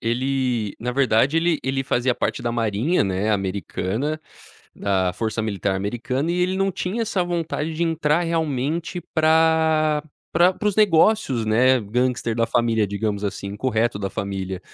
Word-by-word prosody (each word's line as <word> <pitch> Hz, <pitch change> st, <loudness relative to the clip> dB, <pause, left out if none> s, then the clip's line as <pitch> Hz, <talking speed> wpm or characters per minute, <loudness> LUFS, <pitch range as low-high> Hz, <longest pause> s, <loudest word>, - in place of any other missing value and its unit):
ele 125 Hz, -2 st, -1 dB
na 125 Hz, +2 st, -3 dB
verdade, 135 Hz, +2 st, +2 dB
ele 165 Hz, -1 st, +2 dB
ele 135 Hz, 0 st, -1 dB
fazia 125 Hz, -1 st, 0 dB
parte -, -, -2 dB
da 120 Hz, -, -1 dB
Marinha, 115 Hz, -, +1 dB
né, 95 Hz, +2 st, -1 dB
americana, 100 Hz, +8 st, -2 dB, 0.6 s
da 95 Hz, -2 st, 0 dB
Força 110 Hz, +1 st, -2 dB
Militar 100 Hz, -2 st, -1 dB
americana, 120 Hz, -, -2 dB
e 175 Hz, -, 0 dB
ele 185 Hz, +1 st, 0 dB
não 195 Hz, 0 st, +1 dB
tinha 190 Hz, +4 st, -3 dB
essa 195 Hz, -5 st, 0 dB
vontade 165 Hz, -2 st, -2 dB
de 170 Hz, -, -2 dB
entrar 165 Hz, -1 st, +1 dB
realmente 160 Hz, +1 st, -2 dB
pra 160 Hz, -1 st, +3 dB, 0.3 s
pra 175 Hz, +3 st, +4 dB
para 210 Hz, +3 st, -1 dB
os 200 Hz, -, -2 dB
negócios, 180 Hz, -, +3 dB
né, 125 Hz, +4 st, +4 dB
gangster 120 Hz, +1 st, -1 dB
da 115 Hz, -1 st, +2 dB
família, 115 Hz, -3 st, +1 dB
digamos 100 Hz, 0 st, -2 dB
assim. 100 Hz, 0 st, -4 dB
Incorreto, 110 Hz, +1 st, -1 dB
da 100 Hz, -1 st, -3 dB
família, 95 Hz, -2 st, -4 dB
125 Hz, 155 wpm, -22 LUFS, 110-160 Hz, 0.6 s, pra